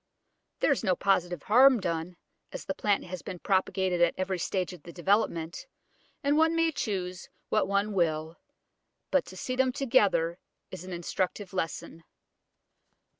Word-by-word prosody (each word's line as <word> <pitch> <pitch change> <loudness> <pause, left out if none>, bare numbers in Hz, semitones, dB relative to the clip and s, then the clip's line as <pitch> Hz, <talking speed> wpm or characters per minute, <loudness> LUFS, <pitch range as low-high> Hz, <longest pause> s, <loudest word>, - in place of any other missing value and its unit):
There - - +4
is 275 - +1
no 185 -4 +2
positive 175 -4 0
harm 255 +3 +6
done, 170 -1 -3 0.3
as - - -7
the 190 - -2
plant 205 0 +1
has 185 0 -7
been 180 - -7
propagated 190 -1 0
at 175 - +4
every 185 -1 -2
stage 185 0 -2
of 175 - -12
development, 175 - -1 0.6
and 285 +1 +3
one 320 +1 +3
may 330 0 +3
choose 185 - -4 0.2
what - - +2
one 200 +2 0
will; 160 -3 0 0.7
but - - +3
to - - -11
see 255 - -3
them 260 0 +2
together 195 -10 +2 0.3
is - - -7
an 185 - -8
instructive 180 +3 -3
lesson. 165 -2 -4
185 Hz, 150 wpm, -29 LUFS, 175-210 Hz, 0.7 s, harm